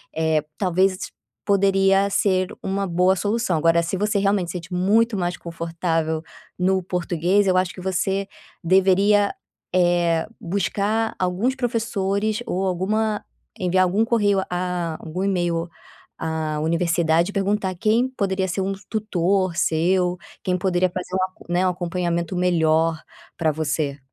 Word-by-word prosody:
eh, 160 -1 +2 0.2
talvez 185 0 +2 0.5
poderia 195 0 +3
ser 185 -2 +2 0.2
uma 195 0 -1
boa 180 +2 +3
solução. 205 -3 0
Agora 165 +1 +3
se 175 +3 -2
você 210 0 +1
realmente 195 -3 +1
sente 175 0 -7
muito 210 +5 +2
mais 175 -1 -1
confortável 165 -1 -2 0.4
no 190 +1 +2
português 180 +2 +1
eu 185 -1 +3
acho 185 -1 +1
que 185 - -10
você 190 +1 -1 0.4
deveria, 195 +3 +4 0.4
eh, 175 -2 +2
buscar 200 +4 -1
alguns 190 +8 0
professores 220 -3 -1
ou 190 +2 -1
alguma 210 +4 0 0.4
enviar 185 0 +2
algum 200 +5 +1
correio 205 -5 +2
a 175 -2 -2
algum 180 +4 -3
email 175 -3 0 0.5
à 160 -1 -2
universidade 170 +2 +1
e - - -18
perguntar 195 -1 0
quem 220 +7 +2
poderia 190 -6 -1
ser 190 +2 -2
um 195 +1 -1 0.2
tutor 190 -4 0
seu, 180 +2 +1 0.3
quem 180 -1 0
poderia 185 0 +1
fazer 180 +1 -5
um 185 - +1
ac 185 -2 -15
né, 180 +2 +2
um 180 - +2
acompanhamento 175 -1 -2
melhor 165 -2 +2 0.4
pra 160 -1 +2
você. 145 -2 -2
185 Hz, 135 wpm, -22 LUFS, 170-200 Hz, 0.5 s, deveria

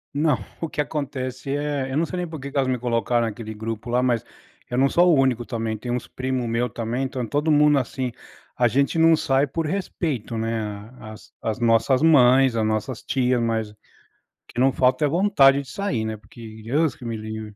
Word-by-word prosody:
Não, 150 -2 +2 0.2
o 165 - -2
que - - -8
acontece 135 -3 -3
é, 145 -2 -2
eu 135 - -1
não 165 - +2
sei 180 - -6
nem 180 - -2
por 160 -2 -7
que 140 +1 -7
que 140 - -4
elas 135 -1 +2
me 130 - +1
colocaram 120 -1 0
naquele 110 0 -6
grupo 110 +2 -5
lá, 125 +1 +2
mas 120 -3 +1 0.5
eu 125 - -2
não 135 +1 +4
sou 175 +5 +4
o 150 - +4
único 130 -3 +2
também, 115 -2 -3
tem 120 +3 -5
uns 125 0 -3
primo 130 -1 -3
meu 115 +2 0
também, 115 +3 -3
então 130 -2 -3
todo 145 +7 -1
mundo, 150 -1 +5
assim, 130 0 -3 0.4
a 120 -1 +3
gente 140 +7 +1
não 165 0 +6
sai 135 +1 +1
por 160 +4 -3
respeito 150 - -3
né, 110 -2 -3
as 110 -1 -12
as 110 -1 -2
nossas 115 +4 +3
mães, 130 -4 +5
as 110 - +1
nossas 110 +3 -2
tias 125 -2 +1
mas, 110 -2 -1 0.7
que - - -7
não 130 0 +4
falta 130 +3 +2
é - - +3
vontade 145 -5 +4
de 135 - -13
sair, 170 - -2
né. 110 0 -3
Porque 110 0 -12
Deus 145 +5 +1
que 125 - -12
me 115 -1 -3
livre. 110 -1 -7
125 Hz, 210 wpm, -23 LUFS, 115-140 Hz, 0.7 s, não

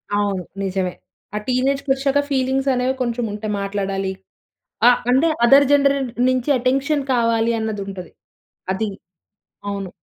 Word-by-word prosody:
అవును. 200 -3 0 0.2
నిజమే. 185 -1 -1 0.4
ఆ - - 0
టీనేజ్కొచ్చాక 270 +2 +1
ఫీలింగ్స్ 265 0 0
అనేవి 255 +1 0
కొంచెం 240 -1 -1
ఉంటే 210 +1 -5
మాట్లాడాలి, 195 -1 -2 0.8
ఆ! - - +10 0.2
అంటే 265 +6 +4 0.2
అదర్ 275 +3 +7
జెన్‌రెంట్ 280 -3 +3 0.2
నుంచి 255 +1 0
అటెన్షన్ 275 +4 0
కావాలి 230 -1 +2
అన్నది 220 -2 -3
ఉంటది, 185 -3 -8 0.6
అది. 215 +2 -2 0.8
అవును. 200 -2 -4
245 Hz, 120 wpm, -20 LUFS, 200-270 Hz, 0.8 s, ఆ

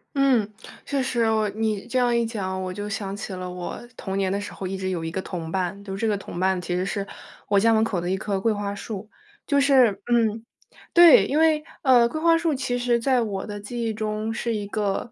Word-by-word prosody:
嗯， 255 -7 +3 0.3
确 280 -1 -1
实。 250 -2 -1
我 215 -1 +1
你 215 -1 -2
这 250 +2 -2
样 245 -1 +3
一 235 0 +2
讲， 190 -4 -3
我 185 0 -4
就 205 +2 -5
想 200 -1 -4
起 200 - -6
了 185 -1 -5
我 180 0 -6 0.2
童 190 -3 -4
年 195 -1 +1
的 200 +2 -1
时 205 - -7
候 190 - -6
一 190 - -4
直 190 0 -3
有 170 -3 -3
一 - - -2
个 190 - -3
同 170 -4 -6
伴， 190 +2 -2
就 195 -1 -5
这 210 +3 -2
个 210 -2 +1
同 195 - -8
伴 190 0 +1
其 175 0 -3
实 180 +1 -1
是 200 0 -3 0.4
我 205 - +2
家 225 +3 +4
门 220 - +3
口 205 -5 0
的 175 - -3
1 190 - 0
棵 200 -1 -2
桂 225 +4 +1
花 205 -1 -3
树。 210 0 -7 0.4
就 285 - +3
是 265 -5 +5 0.2
嗯。 225 -1 +2 0.5
对， 345 -3 +8
因 285 - -1
为， 315 -1 +4 0.2
呃， 250 -4 +5
桂 310 +6 -4
花 330 0 +5
树 330 -3 0
其 250 -2 -2
实 245 -1 +2
在 255 +1 +2
我 200 -4 -3
的 205 -1 -6
记 235 +4 -5
忆 225 -1 -1
中 215 +1 -3
是 230 0 -2
一 205 -1 -3
个 205 +2 -2
215 Hz, 260 characters per minute, -24 LUFS, 195-240 Hz, 0.5 s, 对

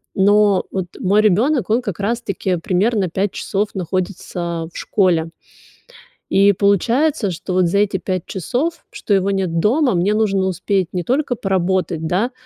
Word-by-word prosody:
Но 205 0 +3
вот 190 -2 -3
мой 205 +3 +3
ребёнок, 220 +3 +2
он 240 +3 +2
как 200 -2 -5
раз 235 +4 -1
таки 190 -2 -2
примерно 190 +4 0
5 190 +3 -1
часов 205 +1 -2
находится 175 -2 -3
в - - -25
школе. 170 -5 +1 1.0
И 200 +1 +4
получается, 215 - +1
что 180 +2 -5
вот 180 -1 +3
за 200 - +1
эти 205 -1 +1
5 185 -1 -3
часов, 275 - -3
что 205 - -2
его 195 +1 +2
нет 185 -4 -1
дома, 255 +2 +2
мне 190 +5 +1
нужно 200 -3 +1
успеть 185 0 -1
не 180 -1 -3
только 260 - 0
поработать, 185 -4 -1
да, 195 +10 0
195 Hz, 160 wpm, -19 LUFS, 180-215 Hz, 1.0 s, И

